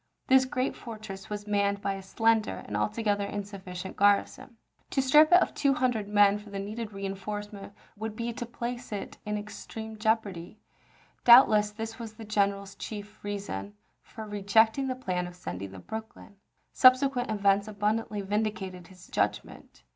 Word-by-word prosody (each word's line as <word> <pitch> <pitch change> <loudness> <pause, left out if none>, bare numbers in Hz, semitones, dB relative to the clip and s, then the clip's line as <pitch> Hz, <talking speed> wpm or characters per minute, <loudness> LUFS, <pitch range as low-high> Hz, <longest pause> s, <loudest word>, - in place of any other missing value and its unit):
This 260 0 +5
great 255 0 -1
fortress 215 -4 -9
was 205 0 -5
manned 200 -1 +1
by 200 -1 -1
a 195 - -6
slender 225 +3 +1
and - - -5
altogether 210 -2 0
insufficient 195 -3 -6
garrison. 205 +4 +2 0.3
To - - -1
strip 300 +4 +6
it 355 - +9
of - - -5
two 280 -2 +2
hundred 245 -5 0
men 205 0 +4
for 210 0 -13
the 200 - -6
needed 215 +3 -5
reenforcement 200 +1 -6 0.2
would 220 0 -5
be 235 +1 -3
to 240 +1 -5
place 240 +1 -5
it 205 - -6
in 210 0 -1
extreme 220 +1 -8
jeopardy. 215 -5 -1 0.7
Doubtless 220 -4 +7
this 225 +2 -7
was 225 -2 -7
the 225 - -9
general's 200 -2 0
chief 210 +1 -8
reason 195 - -5 0.3
for 220 - -9
rejecting 220 +5 +2
the 255 - -2
plan 180 -8 -2
of 175 - -11
sending 95 - -6
the 95 - -11
Brooklyn. 220 - -9 0.4
Subsequent 255 -1 +5
events 200 -1 +2
abundantly 210 0 -1
vindicated 195 -3 -3
his 185 -1 -15
judgment. - - -3
210 Hz, 155 wpm, -28 LUFS, 200-225 Hz, 0.7 s, it